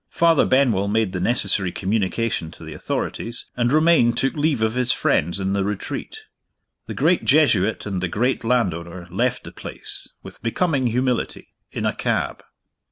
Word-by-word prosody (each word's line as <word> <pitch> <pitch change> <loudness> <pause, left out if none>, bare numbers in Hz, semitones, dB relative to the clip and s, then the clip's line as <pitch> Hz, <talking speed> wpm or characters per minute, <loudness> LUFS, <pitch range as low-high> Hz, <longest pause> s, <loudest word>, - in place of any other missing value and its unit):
Father 165 -2 +3
Benwell 125 -7 +3
made 105 -2 0
the 90 - -2
necessary 100 -3 +1
communication 100 -2 -1
to 85 - -12
the 80 0 -8
authorities, 115 +8 -3
and 120 0 +1
Romayne 155 -6 +4
took 135 +3 0
leave 145 -6 0
of 110 0 +1
his 125 0 +1
friends 85 +5 +1
in 95 0 -1
The 100 -1 +1
Retreat. 100 0 -5 0.6
The - - -5
great 165 +6 +2
Jesuit 115 -9 +3
and 95 -3 -3
the 95 - 0
great 120 +9 0
landowner 90 -7 -1
left 120 +7 0
the - - -9
place, - - -7 0.2
with - - -12
becoming 135 +2 0
humility, 125 +1 -1 0.2
in - - -3
a - - +1
cab. - - -2
115 Hz, 165 wpm, -22 LUFS, 95-130 Hz, 0.6 s, Romayne